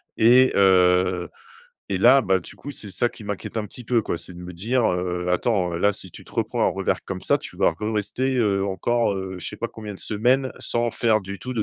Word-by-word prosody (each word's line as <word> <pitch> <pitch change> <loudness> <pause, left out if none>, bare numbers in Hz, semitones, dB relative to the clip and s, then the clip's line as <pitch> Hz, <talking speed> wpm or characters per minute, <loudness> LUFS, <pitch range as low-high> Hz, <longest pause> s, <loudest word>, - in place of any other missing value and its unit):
Et 125 +3 +5
heu 90 -2 +4 0.6
et 100 - +1
là 125 +8 +6
bah, 95 -5 +2
du 90 - -12
coup 145 - -9
c’est 105 -7 -8
ça 120 +6 0
qui 110 - -13
m’inquiète 105 +2 -5
un 110 - -1
petit 125 - -11
peu 115 0 +2
quoi. 85 - -3
C’est 90 - -12
de - - -11
me 90 - -8
dire, 115 +8 0
heu: 90 0 -2
«attends, 90 -2 +1
heu, - - -2
là, 100 +3 +2
si 95 -1 -9
tu - - -12
te - - -18
reprends - - -2
un - - +4
revers - - -1
comme - - -6
ça, - - +2
tu - - -11
vas - - +3
re-rester, 110 +5 -2
heu, 100 -5 +2
encore, 115 +3 0
heu, 95 -1 -5
je 90 - -6
sais 105 - -8
pas 115 - -3
combien 105 -2 -8
de - - -12
semaines 125 +5 +1
sans 120 0 -1
faire 110 -2 +1
du 100 +1 -7
tout 130 0 -6
de 110 - 0
105 Hz, 250 wpm, -23 LUFS, 95-120 Hz, 0.6 s, là